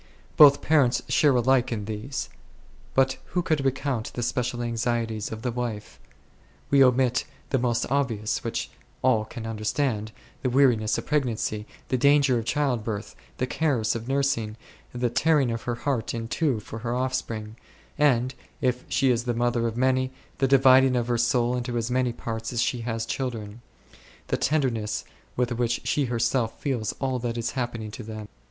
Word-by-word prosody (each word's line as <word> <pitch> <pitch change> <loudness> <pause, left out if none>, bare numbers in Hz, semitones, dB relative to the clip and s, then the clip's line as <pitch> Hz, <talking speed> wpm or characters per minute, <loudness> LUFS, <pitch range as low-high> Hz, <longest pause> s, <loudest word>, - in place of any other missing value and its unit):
Both 145 -2 +8
parents 145 -6 +3
share 135 +2 +4
alike 125 +1 +3
in 105 -3 -3
these; 110 +6 -4 0.7
but 130 0 +3 0.2
who 175 - +3
could 155 -4 0
recount 135 -3 -1
the 120 - -3
special 120 0 -1
anxieties 115 -2 -1
of 110 +1 -6
the 125 - 0
wife? 120 -3 -5 0.7
We 140 -1 +7
omit 125 -1 +3 0.3
the 135 - +2
most 120 -1 +1
obvious, 120 -7 0
which - - -3 0.3
all 115 -4 +3
can 115 +1 -8
understand, 110 0 -1 0.3
the 130 - 0
weariness 120 -5 +3
of - - -4
pregnancy, 115 -7 -1 0.2
the 130 - +1
danger 140 -2 +4
in 115 - -5
childbirth, 120 -6 -1 0.2
the 125 - 0
cares 130 -6 0
of 115 0 -5
nursing, 135 -6 0 0.3
the 120 -1 -1
tearing 140 0 +3
of 115 -1 -3
her 120 - 0
heart 120 -3 -2
in 115 -1 -4
two 135 -3 0
for 110 +1 -8
her 120 +1 -2
offspring, 120 -4 -3 0.4
and, 130 -4 +2 0.3
if 125 -1 0
she 130 0 +3
is 120 0 0
the 120 -1 -1
mother 120 0 +1
of 115 0 -4
many, 130 0 +2 0.3
the 135 - +3
dividing 130 -1 +6
of 120 -1 0
her 120 - +2
soul 120 +1 +2
into 120 -1 -2
as 115 +1 -2
many 125 -1 +1
parts 115 -1 -5
as 120 - -2
she 125 - -1
has 115 -1 -2
children; 115 -3 -4 0.7
the - - +1
tenderness 125 -8 0 0.3
with 125 0 0
which 120 0 0
she 145 - +1
herself 115 -1 0
feels 125 -7 -1
all 130 -2 -2
that 120 -1 -3
is 115 -1 -2
happening 120 -4 -4
to 115 - -8
them. 110 -1 -7
120 Hz, 170 wpm, -26 LUFS, 115-130 Hz, 0.7 s, Both